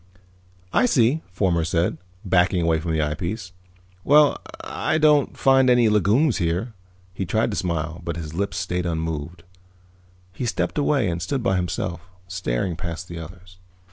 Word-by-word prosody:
"I 250 - +4
see," 135 - +3
Fomar 90 -3 +1
said, 85 0 0 0.3
backing 90 -1 +2
away 80 -1 +2
from 80 +1 -3
the 80 -1 +1
eyepiece. 90 +6 -3 0.5
"Well, 145 0 +5 0.2
I 155 - -1
won't 150 -3 +3
find 135 -1 +4
any 120 -2 +5
legumes 110 - +3
there." 90 +7 -1 0.4
He 95 - -3
tried 110 +5 0
to - - -3
smile, 85 -2 -2
but 85 -1 -4
his 80 -2 -6
lips 95 +1 -2
stayed 90 0 -2
unmoved. 80 0 -4 0.9
He 120 +5 -3
stepped 90 - -1
away 140 -6 +2
and 85 -1 -2
stood 125 - -2
by 95 - +2
himself, 85 -1 -2 0.3
staring 90 -3 -2
past 85 +1 -6
the 85 -1 -6
others. 90 +3 -12
90 Hz, 155 wpm, -23 LUFS, 85-115 Hz, 0.9 s, Well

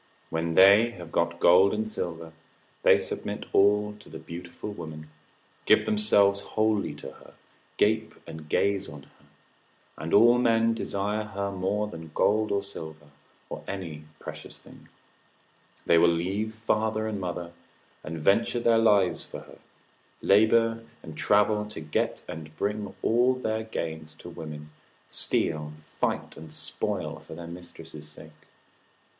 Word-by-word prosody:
When 80 0 -1
they 100 +5 +7
have 85 -2 -10
got 85 0 0
gold 95 +4 +6
and 110 +1 -2
silver, 85 -6 -5 0.5
they - - +6
submit - - -5
all 105 +1 +4
to 80 - -14
a - - -3
beautiful 85 +4 -8
woman, 80 -4 -9 0.6
give - - +5
themselves 100 -2 +3
wholly 110 0 0
to - - -9
her, - - -17 0.4
gape 110 +1 +1
and 80 -2 -10
gaze 100 0 +1
on 75 -3 -10
her, - - -24 0.7
and 80 - -5
all 120 +3 +6
men 115 -1 +3
desire 105 -1 -2
her 100 -2 -3
more 100 +2 -1
than 80 -6 -9
gold 110 +1 +2
or 100 0 0
silver, 80 -6 -10 0.4
or - - -7
any 85 -6 -6
precious - - -9
thing: - - -17 1.0
they 85 - +5
will 85 - +6
leave 95 +6 -1
father 110 0 -1
and 105 -3 -3
mother, 85 -1 -4 0.5
and 80 +1 -5
venture 100 +9 +2
their 115 -1 +4
lives 105 -5 +3
for - - -9
her, - - -15 0.6
labour 115 +2 +4 0.2
and 80 - -9
travel 105 +4 +3
to 105 - -7
get, 75 -1 -2
and 80 -1 -9
bring 105 0 -2
all 125 +3 +3
their 110 -3 -2
gains 80 -7 -5
to 85 - -11
women, 75 -2 -8 0.4
steal, 75 -1 0
fight, - - -3
and 80 0 -10
spoil - - -4
for - - -11
their 85 +1 -8
mistress's 85 -3 -10
sake. 75 +1 -12
100 Hz, 145 wpm, -27 LUFS, 80-110 Hz, 1.0 s, they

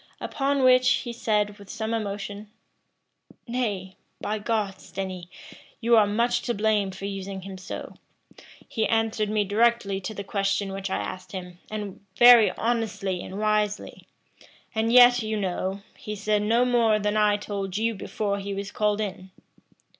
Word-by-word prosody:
Upon 275 0 0
which 255 0 +6 0.2
he 240 - -4
said, 210 -2 0
with 200 -1 -14
some 225 0 -3
emotion, 205 -1 -4 1.0
"Nay, 205 -6 -3 0.2
by 215 +1 -2
God, 205 -3 -1
Stenny, 185 -3 -6 0.5
you 235 0 +4
are 215 -2 +5
much 235 +4 +1
to 240 - -2
blame 210 -1 +1
for 190 +1 -7
using 195 -1 -5
him 190 +1 -8
so: 185 - -7 0.7
he 220 -2 -1
answered 225 -1 0
me 210 -1 +1
directly 205 -1 +1
to 215 +3 -5
the 200 - -5
question 195 0 -1
which 195 0 -4
I - - -1
asked 185 - -6
him, 180 -2 -7
and 205 -3 -6
very 240 -2 +8
honestly 210 -6 -1
and 190 - -7
wisely; 210 -1 -1 0.7
and 225 +1 0
yet, 245 0 +7
you 215 0 -2
know, 190 +1 -2
he 210 - -6
said 210 0 0
no 230 +4 +3
more 235 -3 +3
than 210 0 -1
I 210 -1 +3
told 200 -2 -4
you 225 +1 +1
before 200 0 -3
he 200 0 -4
was 200 0 -5
called 210 0 0
in." 190 -2 -5
210 Hz, 160 wpm, -26 LUFS, 195-225 Hz, 1.0 s, very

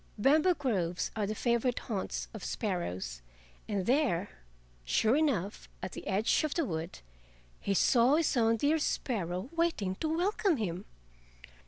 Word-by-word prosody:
Bamboo 305 - +4
groves 190 - -1
are 210 -2 -1
the 215 - -3
favorite 235 +2 +1
haunts 205 -5 -3
of 215 - -8
sparrows, 95 - -3 0.5
and 200 -4 -1
there 240 - +2 0.5
sure 220 - +2
enough 245 - 0
at 185 - -3
the - - -8
edge 205 +8 +2
of 310 - -1
the 330 - +1
wood 165 -3 -5 0.6
he 200 - -1
saw 245 +7 +5
his 320 -2 +2
own 230 -1 +3
dear 295 +7 +2
sparrow 195 - -2
waiting 330 - +1
to 315 - -2
welcome 390 -1 +1
him. 190 -3 -3
225 Hz, 145 wpm, -31 LUFS, 185-290 Hz, 0.6 s, saw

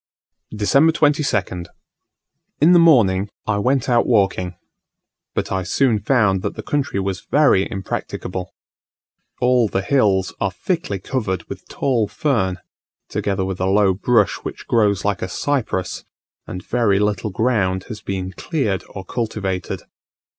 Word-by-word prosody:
December 140 +10 +4
22nd. 135 - 0 0.9
In 155 +5 +6
the 175 - +7
morning 105 - +4 0.2
I 105 -1 0
went 130 +3 +1
out 120 -2 +3
walking; 95 -5 +1 0.8
but - - -2
I 95 -1 0
soon 115 +3 +1
found 105 -7 +2
that - - -3
the - - -6
country 140 -8 -1
was 95 -1 -3
very 140 -10 +4
impracticable. 95 -1 -5 0.9
All 125 -2 +4
the 95 -1 -2
hills 100 -8 +2
are 100 - +2
thickly 100 - -2
covered 95 -4 -2
with - - -9
tall 120 -6 0
fern, 105 -5 0 0.5
together 95 -2 -1
with 95 -1 -4
a 95 - 0
low 100 0 +4
bush 105 0 +2
which - - -8
grows 105 -4 +2
like 100 -1 0
a 90 - -3
cypress; 120 -10 -2 0.4
and 90 0 -7
very 115 -5 +2
little 105 +1 0
ground 100 -3 0
has 110 -3 -8
been 95 -1 -4
cleared 110 - -2
or 95 -1 -8
cultivated. 100 -6 -3
105 Hz, 140 wpm, -20 LUFS, 95-125 Hz, 0.9 s, the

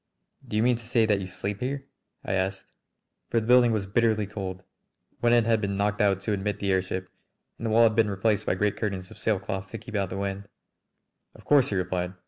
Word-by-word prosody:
"Do 105 - -2
you 110 - +3
mean 125 -1 +3
to 115 - -11
say 115 -1 +2
that 105 -2 +2
you 95 - -5
sleep 100 +2 -4
here?" 135 +2 -3 0.4
I - - -1
asked. 95 0 -1 0.6
For 115 - +2
the 110 - -5
building 125 0 +6
was 110 -3 0
bitterly 110 +1 +2
cold; 95 -2 -6 0.6
one 120 - +3
end 120 -2 +4
had 115 -1 +2
been 100 -1 -1
knocked 105 +1 0
out 100 -2 +2
to 105 +1 -1
admit 100 0 -2
the 100 -1 -1
airship, 95 0 -1 0.5
and 115 - -3
the - - 0
wall 115 +2 +5
had 110 -2 +4
been 110 -2 +3
replaced 105 +1 0
by - - +2
great 105 +2 0
curtains 95 -4 -3
of - - -13
sailcloth 95 -2 -2
to 115 - -6
keep 115 +2 -11
out 100 -3 0
the 95 - -5
wind. 100 0 -3 0.9
"Of - - -16
course," 145 -4 +5
he 100 - -2
replied. 90 0 -2
105 Hz, 230 wpm, -27 LUFS, 95-115 Hz, 0.9 s, building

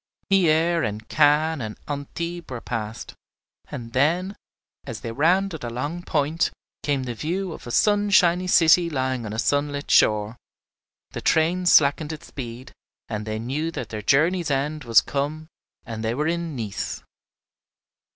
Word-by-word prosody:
Hyères 170 -2 +3
and 110 +1 -4
Cannes 150 0 +3
and 110 -2 -5
Antibes 170 +4 -5
were 125 -2 -5
passed, 110 -2 -5 0.6
and 115 -1 -7
then, 175 +9 +1 0.5
as - - -7
they 115 - -5
rounded 165 +5 +1
a 120 - -3
long 145 +9 -4
point, 155 -1 0 0.3
came 140 -3 0
the 125 -1 -4
view 175 - -3
of - - -11
a - - -5
sunshiny 195 - +3
city 170 0 +5
lying 130 -5 -2
on - - -6
a - - -5
sunlit 145 +3 0
shore; 105 +2 +3 0.7
the - - -6
train 175 +3 +2
slackened 150 -1 +4
its 155 - -8
speed, 125 -1 -8 0.4
and 105 -1 -4
they 110 0 -2
knew 135 +8 -2
that 145 -7 -6
their 110 -1 -5
journey's 160 - +2
end 145 +1 -1
was 115 -2 +6
come 145 +3 -3 0.4
and 115 -3 -6
they 115 +1 -1
were 150 +3 0
in 170 -2 -2
Nice. 110 -5 -4
145 Hz, 150 wpm, -24 LUFS, 120-170 Hz, 0.7 s, was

